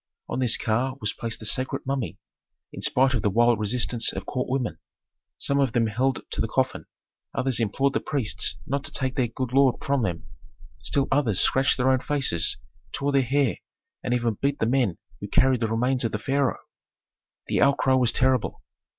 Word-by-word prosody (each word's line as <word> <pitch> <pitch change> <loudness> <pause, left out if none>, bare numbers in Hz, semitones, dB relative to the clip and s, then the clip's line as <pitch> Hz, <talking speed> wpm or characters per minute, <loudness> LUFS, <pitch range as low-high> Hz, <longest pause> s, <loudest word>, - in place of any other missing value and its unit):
On - - -3
this 125 -3 +3
car 125 +4 -1
was 105 -4 -1
placed 115 -1 -5
the 110 - -7
sacred 130 +4 0
mummy, 135 -3 -3 0.6
in - - -7
spite 130 +1 +2
of 120 - 0
the 105 - +1
wild 120 +2 +3
resistance 115 +2 +2
of - - -6
court 125 0 -3
women. 130 -3 -2 0.6
Some 140 0 0
of 135 -4 +1
them 120 -3 +2
held 125 +4 0
to - - -1
the - - 0
coffin, - - -1 0.5
others 130 -2 +1
implored 130 +5 +1
the - - +1
priests 135 -8 -1
not 140 +1 -2
to - - -7
take 130 -1 -2
their 130 -4 +1
good 125 +2 -5
lord 135 -2 +4
from 140 -1 +1
them, 90 -6 -3 0.5
still 140 -1 0
others 125 -9 +2
scratched 135 +1 +3
their 130 +1 +3
own 130 - +3
faces, 130 - +1 0.3
tore 140 +1 -1
their 140 -1 +3
hair, 135 0 +1 0.5
and - - -2
even 115 -3 -1
beat 140 +1 +1
the - - 0
men 120 -6 +1 0.2
who - - -6
carried 130 -1 +3
the 115 - 0
remains 125 +3 +1
of 115 - -1
the - - 0
pharaoh. 135 +4 0 0.9
The - - 0
outcry 140 -1 +3
was 125 -3 +3
terrible. 130 -2 0
130 Hz, 195 wpm, -25 LUFS, 115-135 Hz, 0.9 s, lord